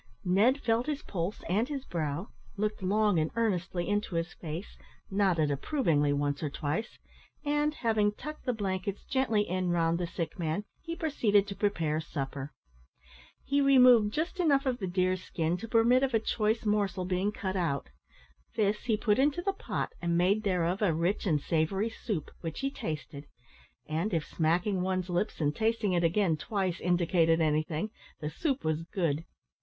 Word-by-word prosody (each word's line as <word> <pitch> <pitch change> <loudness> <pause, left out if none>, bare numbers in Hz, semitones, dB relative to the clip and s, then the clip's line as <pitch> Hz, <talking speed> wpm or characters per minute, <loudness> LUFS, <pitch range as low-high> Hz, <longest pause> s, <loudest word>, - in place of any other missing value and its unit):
Ned 210 +10 +4
felt 230 +1 +1
his 300 -1 -2
pulse 180 +2 -4
and 215 - +1
his 275 -2 -4
brow, 160 +2 -3 0.3
looked 210 0 -1
long 205 -1 +2
and 155 0 +1
earnestly 185 -6 0
into 205 -3 -1
his 165 +1 -1
face, 165 +4 -7 0.4
nodded 185 -7 +2
approvingly 150 - +1
once 145 0 0
or 150 - -1
twice, 150 +10 -3 0.5
and, 295 +1 +1
having 220 -5 +2
tucked 305 +8 -8
the - - +3
blankets 195 -2 -3
gently 225 -6 +1
in 185 0 -1
round 170 -1 +2
the 175 - -1
sick 170 +1 -5
man, 165 +4 -1 0.2
he 335 0 -5
proceeded 220 -12 +2
to 200 -1 -6
prepare 165 -6 0
supper. 140 -2 -5 0.9
He 280 +1 +1
removed 250 -6 +6
just 330 - -2
enough 285 -5 +3
of 255 -2 0
the 190 - -2
deer's 185 0 +1
skin 165 -1 -1
to 230 - -7
permit 235 +3 +4
of 265 -3 +1
a - - +4
choice 220 0 0
morsel 200 -3 +1
being 185 +3 0
cut 195 -3 -4
out; 150 - -1 0.7
this 210 +1 +1
he 225 -3 +2
put 210 +1 +2
into 290 +5 +2
the 395 - 0
pot, - - -3
and 170 -1 +1
made 190 +5 +3
thereof 185 -2 0
a 180 -7 +3
rich 175 +6 0
and 155 -4 +3
savoury 170 +9 0
soup, 205 -8 -4
which 165 - -5
he 275 0 -1
tasted; 150 - -6 0.6
and, 165 +5 -1
if 160 -1 0
smacking 180 +4 +1
one's 185 -1 -1
lips 180 +5 -1
and 150 -2 +1
tasting 220 -2 +1
it 175 -1 +2
again 170 -1 +2
twice, 190 +1 -2
indicated 170 -2 +3
anything, 155 +5 0 0.3
the 150 0 -4
soup 275 - -1
was 155 0 0
good. 165 -3 -1
190 Hz, 170 wpm, -30 LUFS, 165-220 Hz, 0.9 s, removed